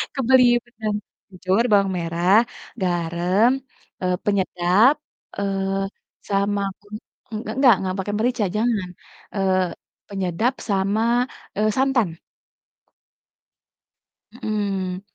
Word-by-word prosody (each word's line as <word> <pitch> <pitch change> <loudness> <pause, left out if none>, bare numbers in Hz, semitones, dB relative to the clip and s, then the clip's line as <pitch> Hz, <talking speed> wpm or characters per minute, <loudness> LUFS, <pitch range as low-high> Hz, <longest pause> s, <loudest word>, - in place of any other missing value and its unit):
Kebelieur-kan. 240 -4 +3 0.3
Kencur, 190 +3 0
bawang 200 -2 +4
merah, 170 +3 +2 0.5
garam, 175 +5 +2 0.5
eee, 180 -1 +1
penyedap, 195 +4 +3 0.4
eee, 195 -1 -1 0.4
sama 200 0 +1 0.2
kun 205 0 -18 0.4
eng 215 -1 -3 0.2
enggak, 260 -4 +7
enggak 185 -1 -2
pake 190 +2 -2
merica, 230 -1 +1
jangan, 215 -5 0 0.5
eee, 190 -1 +2 0.4
penyedap 195 +5 -1 0.2
sama, 220 +5 +2 0.3
eee, 215 +2 +2
santan. 255 -10 +1 2.2
Mhm. 195 -3 -2
200 Hz, 85 wpm, -22 LUFS, 185-225 Hz, 2.2 s, enggak